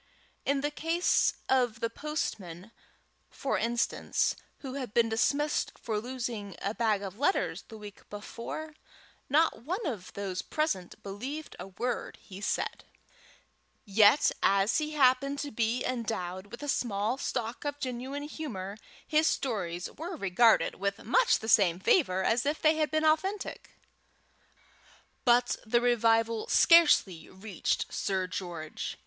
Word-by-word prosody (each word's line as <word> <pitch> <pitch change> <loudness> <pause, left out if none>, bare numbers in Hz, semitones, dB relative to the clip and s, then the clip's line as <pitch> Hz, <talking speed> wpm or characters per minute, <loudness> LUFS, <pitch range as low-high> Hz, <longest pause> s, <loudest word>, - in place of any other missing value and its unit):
In 280 0 +2
the 290 +1 -1
case 330 +4 +1
of 245 -4 +2
the 230 - 0
postman, 225 - -5 0.6
for - - -2
instance, 235 0 0 0.3
who 265 -2 -6
had 255 -6 -6
been 235 -1 +4
dismissed 285 +7 +1
for 220 -2 -2
losing 235 -5 -5
a 200 - -2
bag 220 -4 +1
of 195 +2 -7
letters 380 +8 0
the 220 - -10
week 210 -2 -12
before, 235 +9 -7 0.6
not 310 +1 +3
one 365 - -3
of 215 - -4
those 190 -2 -3
present 250 - -3
believed 255 +11 -6
a - - -6
word 235 +6 -4
he 195 -1 -11
said; - - -2 1.0
yet 210 +7 +5
as 195 +7 +3
he 305 0 -3
happened 275 0 +3
to 285 0 -4
be 230 +1 0
endowed 205 -6 -3
with 235 +7 -10
a - - -4
small 230 -2 -1
stock 235 -3 -3
of 290 -1 -3
genuine 265 +2 -4
humour, 220 -11 -6 0.3
his 310 +1 +3
stories 180 -9 -2
were 340 +4 -6
regarded 220 - +3
with 200 +1 -2
much - - +4
the 220 - -8
same 185 -6 +4
favour 190 - +2
as 230 +4 +2
if 295 +2 -1
they 310 0 +3
had 310 -1 +1
been 310 0 +1
authentic. 380 +6 0 1.5
But 245 0 +4
the 235 +1 +2
revival 230 -2 +2
scarcely 295 - +5
reached 190 -1 -3
Sir 190 -2 -1
George. 175 -4 -5
235 Hz, 140 wpm, -29 LUFS, 200-290 Hz, 1.5 s, yet